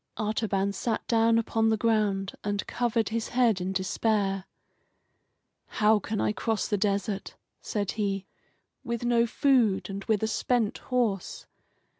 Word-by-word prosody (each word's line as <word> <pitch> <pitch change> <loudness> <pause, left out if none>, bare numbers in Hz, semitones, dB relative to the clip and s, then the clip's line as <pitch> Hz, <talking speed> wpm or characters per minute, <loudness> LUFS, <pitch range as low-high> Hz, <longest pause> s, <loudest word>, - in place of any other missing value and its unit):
Artaban 210 -2 0
sat 220 +3 -2
down 230 -1 +4
upon 225 0 +1
the 220 - +2
ground 210 -3 +1
and 205 -1 -2
covered 230 -3 0
his 225 0 -2
head 235 -6 +2
in 185 +1 -2
despair. 195 0 0 1.3
"How 215 0 +5
can 210 +1 -3
I - - +1
cross 225 -1 -1
the 210 - 0
desert," 200 0 -1 0.3
said 205 -3 -2
he, 195 -3 -2 0.6
"with 235 -2 -3
no 235 -1 +3
food 230 -7 +2
and 195 0 -5
with 220 -2 +1
a - - +2
spent 225 0 0
horse? 230 -7 -1
215 Hz, 140 wpm, -27 LUFS, 200-230 Hz, 1.3 s, How